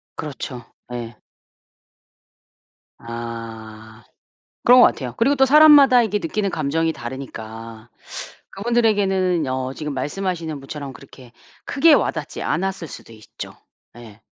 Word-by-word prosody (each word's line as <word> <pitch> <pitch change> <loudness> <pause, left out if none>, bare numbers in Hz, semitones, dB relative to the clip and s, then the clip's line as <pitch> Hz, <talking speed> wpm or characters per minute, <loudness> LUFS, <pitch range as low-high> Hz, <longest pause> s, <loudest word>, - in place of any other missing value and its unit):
그렇죠. 135 -5 -6 0.3
예. 120 -2 -6 1.8
아. 115 -1 -8 0.6
그런 250 +1 +8
것 - - +9
같아요. 125 -4 -3
그리고 275 +5 +3
또 265 - +5
사람마다 285 -3 +7
이게 210 -2 0
느끼는 200 +3 -2
감정이 160 +1 0
다르니까 115 -2 -8 0.6
그분들에게는 195 -6 +1
어 130 0 -3
지금 150 0 -5
말씀하시는 160 +2 -3
분처럼 140 0 -7
그렇게 130 0 -15 0.3
크게 300 +3 +4
와 - - +3
닿지 - - -6
않았을 190 -2 -2
수도 115 - -11
있죠. 110 -1 -10 0.4
예. 110 -2 -13
145 Hz, 270 characters per minute, -21 LUFS, 120-195 Hz, 1.8 s, 것